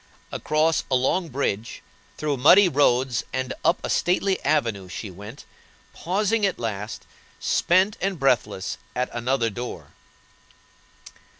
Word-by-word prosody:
Across 155 +1 +1
a 130 - +2
long 160 +7 +1
bridge, 115 -5 -3 0.3
through 150 -2 -1
muddy 175 +10 +7
roads 130 -5 +2
and 130 0 -2
up 175 - +3
a - - -3
stately 185 +2 +1
avenue 115 -11 0
she 100 +3 -6
went, 105 +8 -11 0.5
pausing, 210 +5 0
at 195 -2 +1
last, 105 -1 -5 0.3
spent 185 +4 +2
and 195 -1 -1
breathless 110 -10 0 0.2
at 125 0 -1
another 120 -1 0
door. 100 -10 -7
130 Hz, 120 wpm, -24 LUFS, 115-175 Hz, 0.5 s, muddy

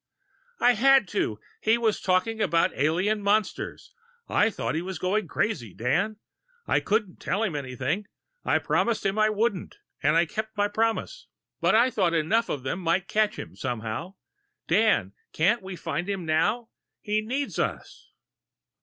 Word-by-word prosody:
"I 245 - +5
had 265 0 +5
to 110 - -1 0.2
he 220 +2 +3
was 225 -3 0
talking 200 +4 +1
about 170 -4 +2
alien 180 +9 +1
monsters. 205 0 -1 0.3
I 210 - +3
thought 215 - -3
he 160 - -1
was 185 +1 -5
going 195 +1 0
crazy, 145 - -2
Dan. 185 - 0 0.5
I - - +2
couldn't 210 -3 -1
tell 210 - -1
him 190 -8 -1
anything 140 - -3 0.4
I - - +2
promised 235 -2 0
him 195 +2 +1
I 215 0 +4
wouldn't, 215 - -1 0.2
and 150 +2 +3
I 170 +1 +4
kept 220 +5 -5
my 205 0 +3
promise. 225 - -1 0.3
But - - +3
I 240 +3 +5
thought 180 -7 +1
enough 215 +9 +1
of 135 - -3
them 135 +7 -2
might 175 +2 0
catch 215 0 +1
him, - - -8
somehow.... 120 - -4 0.5
Dan, 170 - +3 0.2
can't 200 +9 +2
we 190 -1 -7
find 170 +2 -3
him 195 -4 -2
now? 210 +9 +1 0.3
He 210 0 0
needs 265 +6 -3
us!" - - -4
200 Hz, 160 wpm, -26 LUFS, 165-220 Hz, 0.5 s, I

